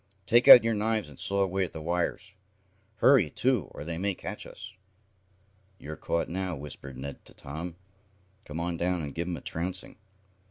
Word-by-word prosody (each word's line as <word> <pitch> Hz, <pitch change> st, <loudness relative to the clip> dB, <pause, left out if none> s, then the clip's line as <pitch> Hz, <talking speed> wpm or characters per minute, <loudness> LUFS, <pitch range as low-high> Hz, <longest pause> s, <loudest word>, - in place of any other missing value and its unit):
Take 120 Hz, +5 st, +4 dB
out 120 Hz, -, +12 dB
your 115 Hz, 0 st, +1 dB
knives 110 Hz, -3 st, -1 dB
and 70 Hz, -, -11 dB
saw 100 Hz, 0 st, +1 dB
away 95 Hz, 0 st, 0 dB
at 90 Hz, -, -5 dB
the 80 Hz, -, -6 dB
wires. 85 Hz, +3 st, -2 dB, 0.6 s
Hurry, 110 Hz, -, +5 dB
too, 125 Hz, -, +1 dB
or -, -, -9 dB
they 85 Hz, +1 st, -5 dB
may 100 Hz, 0 st, -1 dB
catch -, -, -7 dB
us." 105 Hz, +2 st, -10 dB, 1.0 s
"You're 80 Hz, -3 st, -8 dB
caught 85 Hz, +3 st, -1 dB
now," 90 Hz, 0 st, -3 dB
whispered 70 Hz, -2 st, -9 dB
Ned 70 Hz, +2 st, -7 dB
to -, -, -16 dB
Tom. 80 Hz, +5 st, -7 dB, 0.7 s
"Come 75 Hz, +2 st, -6 dB
on 85 Hz, 0 st, -2 dB
down, 90 Hz, -1 st, -1 dB
and 70 Hz, -2 st, -6 dB
give 85 Hz, +1 st, -3 dB
'em 90 Hz, -2 st, -3 dB
a -, -, -10 dB
trouncing." 90 Hz, +3 st, -5 dB
90 Hz, 185 wpm, -28 LUFS, 80-100 Hz, 1.0 s, out